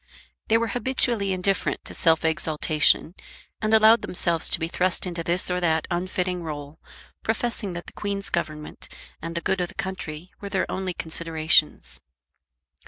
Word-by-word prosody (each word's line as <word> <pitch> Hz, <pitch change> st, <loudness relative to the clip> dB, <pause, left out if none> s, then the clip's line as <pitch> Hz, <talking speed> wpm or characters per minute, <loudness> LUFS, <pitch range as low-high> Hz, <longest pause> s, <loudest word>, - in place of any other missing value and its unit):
They 225 Hz, -, +4 dB
were 230 Hz, 0 st, 0 dB
habitually 245 Hz, -5 st, +2 dB
indifferent 185 Hz, +1 st, -1 dB
to -, -, -4 dB
self 165 Hz, -1 st, +3 dB
exaltation, 155 Hz, 0 st, +2 dB, 0.5 s
and 215 Hz, 0 st, 0 dB
allowed 220 Hz, +1 st, +7 dB
themselves 170 Hz, -2 st, 0 dB
to -, -, 0 dB
be 165 Hz, -, -1 dB
thrust 180 Hz, +2 st, +1 dB
into 170 Hz, -2 st, -3 dB
this 175 Hz, +2 st, 0 dB
or 180 Hz, -, +1 dB
that 160 Hz, -2 st, +1 dB
unfitting 180 Hz, 0 st, -1 dB
role, 150 Hz, -2 st, -7 dB, 0.4 s
professing 220 Hz, -3 st, -2 dB
that 175 Hz, 0 st, -6 dB
the -, -, -12 dB
Queen's 200 Hz, -1 st, -3 dB
Government 155 Hz, -3 st, -4 dB, 0.3 s
and 165 Hz, +1 st, -5 dB
the 170 Hz, -, -1 dB
good 190 Hz, +2 st, 0 dB
of 175 Hz, -, 0 dB
the -, -, -14 dB
country 180 Hz, -2 st, -5 dB
were 200 Hz, -, -5 dB
their 190 Hz, -1 st, 0 dB
only 185 Hz, -2 st, -3 dB
considerations. 160 Hz, -, +1 dB
180 Hz, 160 wpm, -25 LUFS, 160-200 Hz, 0.5 s, allowed